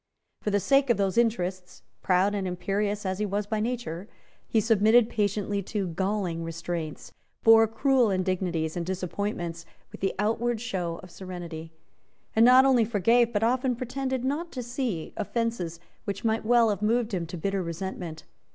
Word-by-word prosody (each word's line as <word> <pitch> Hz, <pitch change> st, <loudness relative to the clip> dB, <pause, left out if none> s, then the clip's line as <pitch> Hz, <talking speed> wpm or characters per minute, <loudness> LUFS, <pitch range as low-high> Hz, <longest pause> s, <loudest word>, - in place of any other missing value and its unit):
For -, -, -1 dB
the 205 Hz, 0 st, +2 dB
sake 275 Hz, +5 st, +3 dB
of 235 Hz, -, +4 dB
those 195 Hz, -2 st, 0 dB
interests, 185 Hz, -6 st, -1 dB, 0.2 s
proud 190 Hz, +2 st, +2 dB
and 195 Hz, -2 st, -2 dB
imperious 200 Hz, +3 st, -2 dB
as 190 Hz, +1 st, -2 dB
he 210 Hz, -, +1 dB
was 205 Hz, +1 st, -1 dB
by 215 Hz, +1 st, -2 dB
nature, 215 Hz, -6 st, -3 dB, 0.4 s
he 225 Hz, -, +2 dB
submitted 220 Hz, +2 st, +4 dB
patiently 205 Hz, -1 st, 0 dB
to 195 Hz, -1 st, -3 dB
galling 185 Hz, -1 st, -1 dB
restraints, 165 Hz, -1 st, -5 dB, 0.3 s
bore 225 Hz, 0 st, +7 dB
cruel 250 Hz, +1 st, +2 dB
indignities 185 Hz, -4 st, -1 dB
and 175 Hz, -, -2 dB
disappointments 180 Hz, -1 st, -3 dB, 0.3 s
with -, -, -11 dB
the 195 Hz, -, 0 dB
outward 225 Hz, +3 st, 0 dB
show 180 Hz, -8 st, -3 dB
of 185 Hz, -, -12 dB
serenity, 170 Hz, -3 st, -7 dB, 0.6 s
and 225 Hz, -, +6 dB
not 255 Hz, +2 st, +8 dB
only 255 Hz, -4 st, +5 dB
forgave, 230 Hz, +2 st, +3 dB
but 210 Hz, -1 st, 0 dB
often 250 Hz, +2 st, +2 dB
pretended 260 Hz, +1 st, -3 dB
not 310 Hz, +6 st, -2 dB
to 250 Hz, -, -4 dB
see, 240 Hz, -, -3 dB
offences 215 Hz, -6 st, -2 dB, 0.3 s
which 200 Hz, +2 st, -4 dB
might 220 Hz, 0 st, +1 dB
well 235 Hz, -1 st, +5 dB
have 200 Hz, -, -3 dB
moved 225 Hz, +1 st, +1 dB
him 170 Hz, -3 st, -2 dB
to 175 Hz, -, -6 dB
bitter 195 Hz, +3 st, -1 dB
resentment. 170 Hz, -1 st, -5 dB
205 Hz, 165 wpm, -27 LUFS, 180-230 Hz, 0.6 s, not